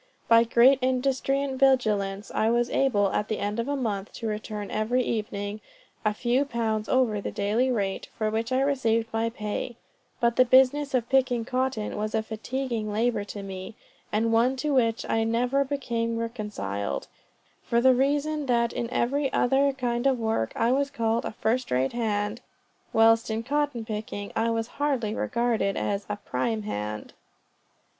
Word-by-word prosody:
By 230 0 +6
great 245 +4 +5
industry 265 +2 +1
and 265 -2 -4
vigilance, 210 -7 +2
I 220 - +2
was 240 +1 +1
able, 205 -8 +2
at 210 - -1
the 215 - -2
end 205 +2 -2
of 235 - -1
a 285 - 0
month, 215 -6 -3
to 230 - -7
return 210 -1 -4
every 230 +4 +1
evening 210 -2 -3 0.4
a 215 - +2
few 240 +5 +1
pounds 225 -5 -2
over 235 -6 +2
the - - -3
daily 215 +6 0
rate, 200 -6 -1
for 215 -1 0
which 225 +3 -2
I 260 +1 +2
received 230 -5 +1
my 225 +1 +1
pay; 220 +2 -4 0.4
but 235 0 +1
the 255 - +8
business 265 +3 +4
of 240 -2 0
picking 255 -3 +2
cotton 255 -3 -1
was 215 +1 -2
a 220 - +1
fatiguing 225 0 -3
labor 225 0 0
to 205 -1 -7
me, 190 +1 -7 0.4
and 225 +2 +1
one 240 +4 +3
to 290 +3 -1
which 230 -4 +2
I 225 - +1
never 245 +5 +1
became 235 -5 -2
reconciled, 210 - -4 0.6
for 235 - +1
the 260 +2 +6
reason 290 +3 0
that 235 -1 +2
in 235 - -3
every 275 +4 0
other 270 +3 +3
kind 245 -1 -1
of 265 -2 +2
work 220 - -1
I 230 - +2
was 280 +2 +1
called 230 -4 0
a - - -3
first 230 +3 -1
rate 130 +1 +1
hand, 210 -1 -1 0.5
whilst 225 0 +4
in 220 +1 -2
cotton 290 -3 -1
picking 210 -2 -5
I 230 +1 +1
was 225 0 0 0.2
hardly 255 -8 0
regarded 230 -4 0
as 200 0 -2
a 210 - -1
prime 205 - -2
hand. 105 - -5
230 Hz, 170 wpm, -26 LUFS, 215-255 Hz, 0.6 s, the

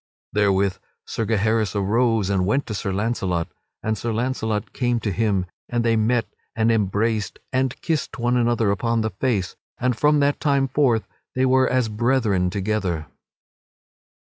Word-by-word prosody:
Therewith 100 -2 +2 0.3
Sir 115 - -3
Gaheris 110 -1 +1
arose, 105 0 +1
and 95 -2 +2
went 135 +7 +1
to 110 - -5
Sir 100 -1 -2
Launcelot, 95 -5 -1 0.3
and 110 0 0
Sir 115 +2 -3
Launcelot 110 -3 -2
came 120 -1 0
to 105 - -2
him 100 -1 +1 0.2
and 120 -1 0
they 115 -1 +3
met 115 +2 +2 0.3
and 115 +1 +3
embraced 105 0 0 0.2
and 130 0 0
kissed 160 -5 -2
one 120 0 +1
another 120 -3 +2
upon 115 +3 0
the 110 0 -1
face; 95 -2 -1 0.2
and 125 0 0
from 150 +3 +3
that 140 0 +2
time 140 -2 +2
forth 125 -7 +2 0.3
they 130 0 +2
were 130 0 +4
as 130 -2 +2
brethren 110 -4 +1
together. 95 -4 -1
110 Hz, 155 wpm, -23 LUFS, 100-125 Hz, 0.3 s, were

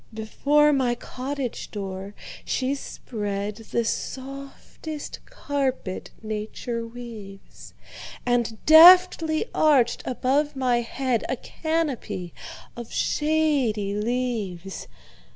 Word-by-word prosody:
Before 290 +7 +2
my 255 -3 +1
cottage 260 +1 -5
door 195 0 -6 0.3
she 260 0 -1
spreadThe 210 -4 -3
softest 275 +5 -6
carpet 265 -9 -3
nature 220 +2 -4
weaves, 230 -5 -11 0.5
And 240 -2 +1
deftly 330 0 +8
arched 275 -6 +3
above 275 +4 0
my 250 -2 +2
headA 255 +1 -1
canopy 260 - -3 0.4
of 235 -1 -8
shady 285 -10 +1
leaves. 210 -5 -3
245 Hz, 80 wpm, -25 LUFS, 215-285 Hz, 0.5 s, deftly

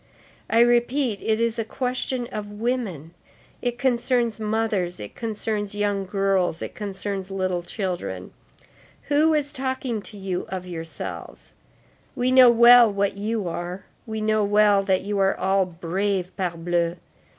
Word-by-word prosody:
I 230 - +4
repeat, 240 -1 +2
it 220 0 0
is 230 0 0
a - - +1
question 250 +1 -2
of 205 -1 -6
women, 205 - -3 0.5
it 245 -1 -2
concerns 240 -2 +1
mothers, 215 -5 -1
it 105 - -8
concerns 210 -2 -3
young 205 -2 -1
girls, 195 -3 +1
it - - -6
concerns 195 -1 -4
little 185 -2 -1
children. 175 - -4 0.8
Who 310 +2 +4
is 290 -1 -1
talking 260 -4 -2
to 205 +1 -10
you 190 -2 -3
of 185 -1 -5
yourselves? 165 -2 -7 0.6
We 255 -1 +1
know 255 -1 +8
well 235 -1 +8
what 200 0 0
you 210 -1 -2
are; 175 +2 -5 0.2
we 220 -1 -4
know 215 0 +2
well 205 0 +4
that 190 -1 +1
you 205 0 -2
are 195 0 +3
all 190 0 +2
brave, 185 +2 -2
parbleu! 170 -1 -1
205 Hz, 140 wpm, -24 LUFS, 185-235 Hz, 0.8 s, know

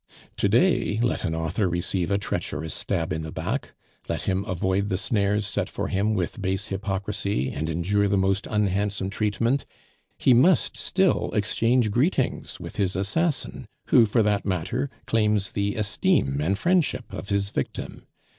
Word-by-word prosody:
To - - +2
day 105 +1 +3
let 120 - 0
an 80 - -1
author 80 +4 0
receive 85 +1 -1
a 100 - +2
treacherous 80 -5 -3
stab 80 -1 -2
in 80 - -3
the 80 0 -6
back, - - -3 0.3
let - - -2
him 95 0 0
avoid 95 +2 0
the 95 - 0
snares 105 -1 +1
set 100 0 -2
for 100 - -3
him 105 +3 +1
with 95 +3 -2
base 95 +2 -1
hypocrisy, 95 -6 -2
and 80 +3 -3
endure 95 +5 +1
the 100 0 +2
most 95 +1 +1
unhandsome 100 -1 0
treatment, 115 +6 0 0.5
he 130 - +4
must 145 +10 +4
still 190 -1 +1
exchange 115 +2 +2
greetings 130 - 0
with - - -8
his 95 -2 0
assassin, 135 - -1 0.2
who, 120 -4 +6
for 110 +2 +2
that 105 -1 +1
matter, 95 - -1 0.2
claims 105 -3 +1
the 100 0 -1
esteem 75 -9 +1
and 95 +6 +1
friendship 170 - +1
of - - -6
his 100 0 0
victim. 70 - -5
100 Hz, 160 wpm, -25 LUFS, 95-110 Hz, 0.5 s, who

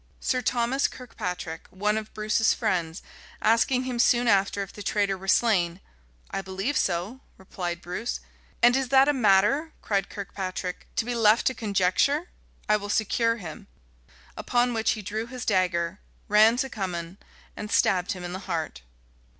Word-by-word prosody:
Sir 255 -1 0
Thomas 245 +3 +1
Kirkpatric, 180 -9 -6
one 210 +3 0
of 220 0 -4
Bruce's 215 +1 +2
friends, 175 -7 -1 0.4
asking 230 +3 +3
him 250 -2 -3
soon 240 0 +4
after 200 -1 +2
if 195 - -11
the 205 - -9
traitor 200 -1 0
were 190 0 -10
slain, 185 -6 +2 0.5
"I - - -2
believe 195 +9 -3
so," 185 +7 -1 0.2
replied 175 -2 -5
Bruce. 180 +7 -4 0.4
"And 240 +1 +7
is 265 -2 0
that 270 +1 +6
a 295 - +4
matter," 245 +7 +3
cried 200 -2 0
Kirkpatric, 190 -2 -5
"to - - 0
be 245 - -2
left 225 -1 +4
to 260 - +2
conjecture? 225 - +1 0.4
I 210 - +4
will 205 0 -7
secure 230 +2 +1
him." 165 -8 -9 0.7
Upon 245 0 +1
which 225 -1 +1
he 215 - -7
drew 215 +3 -3
his 250 0 -7
dagger, 185 -2 +1 0.3
ran 215 +3 +5
to 265 +1 -1
Cummin, 180 -3 -4 0.4
and 210 - -6
stabbed 180 -3 +2
him 180 -2 -8
to 175 - -4
the 185 +1 -5
heart. 160 - -3
210 Hz, 160 wpm, -26 LUFS, 185-240 Hz, 0.7 s, And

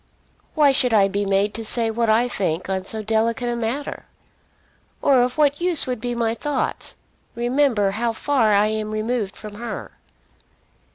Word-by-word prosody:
"Why 295 -3 +5
should 255 -4 +2
I 200 -2 +5
be 200 +1 -2
made 200 +1 +1
to 225 - -4
say 225 +1 -1
what 230 0 0
I 230 +3 +3
think 185 -7 -2
on 190 -1 -2
so 220 +2 -1
delicate 225 +3 0
a 240 - -1
matter? 235 +5 -4 0.9
Or 265 -3 +4
of 250 +2 -1
what 290 0 +2
use 350 -3 +2
would 250 -4 -4
be 245 0 -3
my 230 -1 0
thoughts? 295 +5 -3 0.4
Remember 240 -4 +1
how 230 +3 -1
far 230 -1 +1
I 205 0 +4
am 215 0 -2
removed 215 -1 -2
from 210 -1 -9
her." 235 -1 -6
230 Hz, 170 wpm, -22 LUFS, 215-250 Hz, 0.9 s, Why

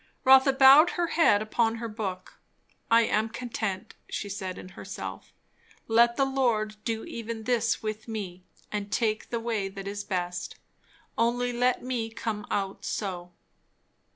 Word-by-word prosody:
Rotha 265 0 +7
bowed 270 +5 +8
her 345 -1 0
head 215 -11 +4
upon 225 +1 +1
her 230 0 -4
book. 195 -4 -6 0.5
I 230 0 +6
am 220 0 +1
content! 220 -5 -4 0.2
she 205 - -4
said 190 -2 -5
in 185 - -9
herself. - - -8 0.6
Let 235 +1 +4
the 275 - +2
Lord 235 -6 0
do 225 -1 -2
even 230 -1 -6
this 235 -1 0
with 215 +1 -4
me, 190 -5 -6 0.3
and 205 -1 -4
take 215 -2 0
the 235 - -2
way 225 -4 -2
that 195 0 -8
is 205 0 -4
best. 180 -3 -3 0.6
Only 245 +1 +1
let 245 +1 +1
me 245 -3 -2
come 225 -2 -4
out 195 -1 -2
so! 180 -4 -4
225 Hz, 150 wpm, -27 LUFS, 205-240 Hz, 0.6 s, bowed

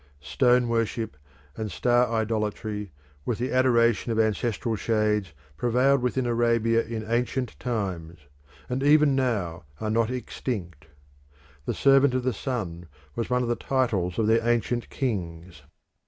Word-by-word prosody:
Stone 120 - +2
worship 115 -3 -1 0.4
and 110 -2 -4
star 120 +5 +2
idolatry, 105 -2 -2 0.3
with 115 - -2
the 125 +2 -2
adoration 120 -2 +3
of 110 - 0
ancestral 110 +1 0
shades, 105 -4 0 0.3
prevailed 125 - +2
within 125 +1 0
Arabia 115 -1 +2
in 110 -1 -5
ancient 120 +1 -1
times, 95 -9 -3 0.5
and 125 +1 -2
even 145 0 +5
now 105 -11 -1 0.2
are 110 0 -2
not 115 0 +2
extinct. 100 - -5 0.8
"The - - -2
servant 135 -1 +4
of 130 - 0
the 130 -1 0
sun" 95 -12 -4 0.3
was 115 - -3
one 125 0 +1
of - - -2
the 120 - +1
titles 110 -12 -1
of 110 - +2
their 115 +1 +3
ancient 120 0 0
kings. 90 - -4
115 Hz, 140 wpm, -26 LUFS, 105-125 Hz, 0.8 s, even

